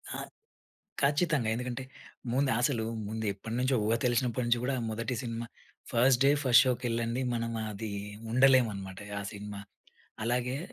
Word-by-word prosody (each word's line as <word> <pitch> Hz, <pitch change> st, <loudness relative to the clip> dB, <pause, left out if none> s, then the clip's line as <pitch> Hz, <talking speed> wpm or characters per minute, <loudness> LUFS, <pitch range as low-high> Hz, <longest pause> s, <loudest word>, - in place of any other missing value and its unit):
ఆ! -, -, -3 dB, 0.9 s
ఖచ్చితంగా 145 Hz, -4 st, +2 dB
ఎందుకంటే 125 Hz, +2 st, -4 dB, 0.5 s
ముందు 135 Hz, +1 st, +2 dB
అసలు 120 Hz, -3 st, +1 dB, 0.2 s
ముందు 110 Hz, 0 st, -4 dB
ఎప్పటినుంచో 120 Hz, +6 st, -1 dB
ఊహ 115 Hz, -, +3 dB
తెలిసినప్పటి 125 Hz, 0 st, +1 dB
నుంచి 120 Hz, 0 st, +2 dB
గూడా 135 Hz, +1 st, 0 dB, 0.2 s
మొదటి 115 Hz, +2 st, -2 dB
సినిమా 115 Hz, -1 st, -4 dB, 0.4 s
ఫస్ట్ 125 Hz, +2 st, +4 dB
డే, 140 Hz, -, +6 dB
ఫస్ట్ 125 Hz, -2 st, +7 dB
షోకెళ్ళంది. 120 Hz, 0 st, 0 dB
మనం 115 Hz, 0 st, -2 dB, 0.2 s
అది 105 Hz, +1 st, -5 dB, 0.4 s
ఉండలేం 130 Hz, -1 st, +6 dB
అన్నమాట 95 Hz, -1 st, -7 dB, 0.2 s
ఆ -, -, -4 dB
సినిమా. 100 Hz, 0 st, -7 dB, 0.6 s
అలాగే 125 Hz, +2 st, 0 dB
120 Hz, 135 wpm, -30 LUFS, 115-130 Hz, 0.9 s, ఫస్ట్